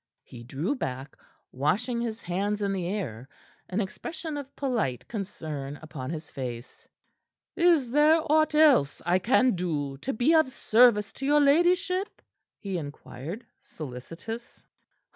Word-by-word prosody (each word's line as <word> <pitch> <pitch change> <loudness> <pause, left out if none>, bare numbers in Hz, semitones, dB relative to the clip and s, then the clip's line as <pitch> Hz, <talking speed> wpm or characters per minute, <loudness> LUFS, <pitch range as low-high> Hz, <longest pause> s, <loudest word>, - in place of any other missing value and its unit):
He 120 - -11
drew 140 - -2
back, 135 - -5 0.4
washing 210 - 0
his 230 -1 -4
hands 205 +4 -1
in 200 -1 0
the 180 -3 -2
air, 135 - -4 0.4
an 190 - -1
expression 315 - -5
of 280 -1 -7
polite 230 - -1
concern 155 - -5
upon 145 -4 -7
his 160 -1 -6
face. 125 -2 -7 0.7
"Is 335 -8 +3
there 300 +4 +5
aught 310 0 +3
else 290 - +4
I 175 +2 +3
can 255 +5 +3
do 150 -7 -2
to 235 - -3
be 260 +7 +2
of 315 -4 +5
service 230 -3 +4
to 270 - -6
your 295 +1 +5
ladyship?" 360 +6 +2 0.4
he 195 -3 -3
inquired, 145 - -8 0.2
solicitous. 165 - -8
205 Hz, 135 wpm, -27 LUFS, -, 0.7 s, there